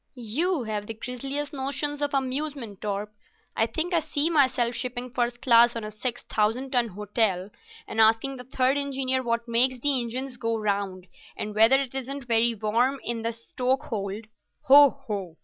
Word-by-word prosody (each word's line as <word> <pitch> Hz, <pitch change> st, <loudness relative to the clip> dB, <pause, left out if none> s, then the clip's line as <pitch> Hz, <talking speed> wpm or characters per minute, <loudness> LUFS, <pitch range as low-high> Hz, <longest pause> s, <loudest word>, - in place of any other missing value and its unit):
"You've 265 Hz, -, -1 dB, 0.2 s
the 225 Hz, -, -5 dB
grisliest 270 Hz, +6 st, -5 dB
notions 280 Hz, +2 st, -2 dB
of 285 Hz, -1 st, -1 dB
amusement, 265 Hz, -5 st, -3 dB
Torp. 205 Hz, 0 st, -3 dB, 0.4 s
I 225 Hz, -, +2 dB
think 340 Hz, +8 st, -3 dB
I 340 Hz, -, +4 dB
see 305 Hz, +1 st, 0 dB
myself 255 Hz, -6 st, +2 dB
shipping 250 Hz, 0 st, -4 dB
first 240 Hz, 0 st, -2 dB
class 235 Hz, -2 st, +6 dB
on 230 Hz, -, -4 dB
a 215 Hz, -, -6 dB
six 240 Hz, +3 st, -4 dB
thousand 225 Hz, +5 st, -1 dB
ton 245 Hz, -2 st, +2 dB
hotel, 205 Hz, -1 st, -1 dB, 0.4 s
and 220 Hz, -, 0 dB
asking 225 Hz, +5 st, +3 dB
the 250 Hz, -, -8 dB
third 260 Hz, +2 st, +1 dB
engineer 265 Hz, -2 st, 0 dB
what 235 Hz, -1 st, -2 dB
makes 250 Hz, +2 st, +2 dB
the 270 Hz, 0 st, +2 dB
engines 250 Hz, +2 st, -4 dB
go 230 Hz, -1 st, -1 dB
round, 200 Hz, -3 st, -2 dB, 0.3 s
and 210 Hz, -, -4 dB
whether 225 Hz, +5 st, +6 dB
it 270 Hz, -3 st, -4 dB
isn't 270 Hz, +1 st, -5 dB
very 230 Hz, 0 st, +3 dB
warm 235 Hz, +6 st, +1 dB
in 235 Hz, -1 st, -3 dB
the 230 Hz, -, -1 dB
stokehold. 230 Hz, -3 st, -3 dB, 0.4 s
Ho! 285 Hz, 0 st, +8 dB
ho! 195 Hz, -9 st, -6 dB
245 Hz, 165 wpm, -26 LUFS, 225-270 Hz, 0.4 s, Ho